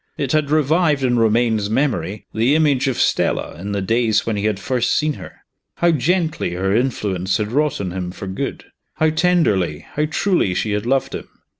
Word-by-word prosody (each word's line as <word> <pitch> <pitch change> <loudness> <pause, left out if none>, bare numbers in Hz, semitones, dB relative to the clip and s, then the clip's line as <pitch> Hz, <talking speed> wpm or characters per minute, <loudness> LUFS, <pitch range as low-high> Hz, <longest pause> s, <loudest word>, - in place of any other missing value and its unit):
It 140 -3 -2
had 155 -2 +1
revived 155 -1 +2
in 120 -2 +2
Romayne's 110 -2 +2
memory 110 - -1
the 115 +7 +2
image 145 -4 +2
of 130 - -1
Stella - - 0
in 100 +3 -5
the 100 -1 -2
days 110 +1 +1
when 115 - -1
he 100 0 -2
had 105 -2 0
first 125 +3 0
seen 155 0 +1
her. - - -11 0.3
How 170 0 +3
gently 160 - 0
her 95 +3 0
influence 100 -7 0
had 105 -1 -3
wrought 150 +2 +1
on 95 -3 -3
him 90 -1 -4
for 95 +2 -8
good! 95 0 -4 0.3
how 155 0 +2
tenderly, 130 - +1
how 150 - 0
truly, 170 - +1
she 105 - -1
had 105 +2 -2
loved 135 +1 0
him. - - -6
120 Hz, 190 wpm, -20 LUFS, 100-150 Hz, 0.3 s, How